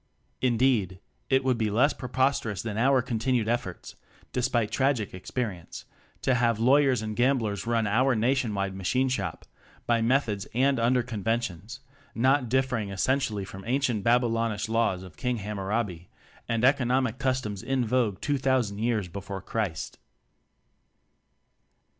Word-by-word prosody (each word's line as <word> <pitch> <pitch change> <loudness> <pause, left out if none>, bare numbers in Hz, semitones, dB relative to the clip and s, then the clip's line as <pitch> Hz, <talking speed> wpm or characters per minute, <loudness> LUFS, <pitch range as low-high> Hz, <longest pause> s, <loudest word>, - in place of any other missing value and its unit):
Indeed, 120 -7 +2 0.3
it 135 0 +3
would 130 -2 +1
be 110 -1 +1
less 125 +8 +3
preposter 130 -1 0
ous 100 -2 -4
than 110 -3 -4
our 130 +3 +3
continued 120 -1 0
efforts 120 -6 -3 0.4
(de 125 - 0
spite 120 -3 0
tragic 130 -6 0
experience) 95 -1 -5 0.4
to 130 - +3
have 115 -2 +2
law 130 +5 +5
yers 130 -6 +2
and 110 0 -4
gamblers 115 -5 +1
run 115 -2 +1
our 125 +5 +2
nationwide 110 -5 0
Machine 125 +8 0
Shop 95 -9 -3 0.4
by 115 -1 +2
methods 115 -4 +1
and 135 +1 +3
under 120 +2 +2
conventions 115 0 -3 0.3
not 130 +1 +2
differing 125 -5 0
essentially 105 0 0
from 95 0 -10
ancient 125 -5 0
Babylonish 115 -3 +1
laws 110 -5 0
of 90 -4 -13
King 125 -1 -1
Hamurabi 100 -3 -3 0.4
and 115 +1 +1
economic 130 -2 +2
customs 130 -7 -1
in 130 +1 0
vogue 110 -4 0
two 145 -1 0
thousand 130 -6 +1
years 110 -4 0
before 100 +2 -6
Christ. 100 -9 -3
115 Hz, 140 wpm, -27 LUFS, 105-130 Hz, 0.4 s, law